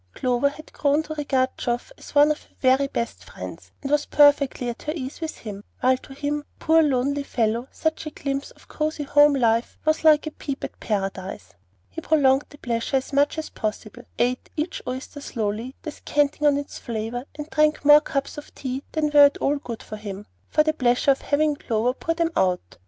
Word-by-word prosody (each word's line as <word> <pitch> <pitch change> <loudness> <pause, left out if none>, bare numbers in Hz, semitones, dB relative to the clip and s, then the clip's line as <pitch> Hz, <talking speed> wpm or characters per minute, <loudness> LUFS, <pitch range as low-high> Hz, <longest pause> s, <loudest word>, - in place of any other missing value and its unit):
Clover 250 +2 +1
had 310 +2 -13
grown 290 +2 +2
to 310 - -6
regard 270 -4 0
Geoff 240 - -2
as - - -14
one 290 +1 +6
of 305 - -3
her - - -25
very 265 +1 +3
best 235 -3 -4
friends, - - -9
and 275 - -3
was 295 0 +2
perfectly 285 -3 +4
at 235 -1 -5
her 305 - -3
ease 270 +1 -6
with 320 -1 -4
him, 205 -2 -8 0.2
while 255 +1 +4
to 270 +1 -13
him, 290 +1 -2
poor 325 0 +4
lonely 280 -1 +1
fellow, 235 -2 -1
such 320 0 -2
a - - -2
glimpse 275 -1 -4
of - - -20
cosey 305 -1 -2
home 290 0 +5
life 230 -2 +1
was 310 0 +2
like 310 -1 +6
a 310 - -4
peep 280 -2 -6
at - - -6
Paradise. 195 - -4 0.3
He 95 - -7
prolonged 275 -3 +3
the 290 - -14
pleasure 235 +1 -1
as 265 +2 -5
much 285 +3 +2
as 315 - -4
possible, 215 +2 -5 0.2
ate 250 +1 0
each 310 +3 -2
oyster 260 +3 -5
slowly, 225 0 -3
descanting 295 -1 0
on 285 -1 +4
its 285 0 -6
flavor, 230 +2 -4
and 300 -1 -5
drank 305 -1 +2
more 295 +1 +9
cups 280 0 -3
of 295 - -14
tea 260 0 -4
than 305 -2 0
were 290 -1 +9
at 285 - +2
all 290 +1 +1
good 235 -5 -7
for 215 - -7
him, 205 -1 -7 0.2
for 305 - +4
the 310 0 +1
pleasure 250 -1 +3
of 270 - 0
having 300 +1 +1
Clover 235 -2 0
pour 330 +5 -2
them 335 0 0
out. 180 - 0
280 Hz, 205 wpm, -24 LUFS, 245-295 Hz, 0.3 s, more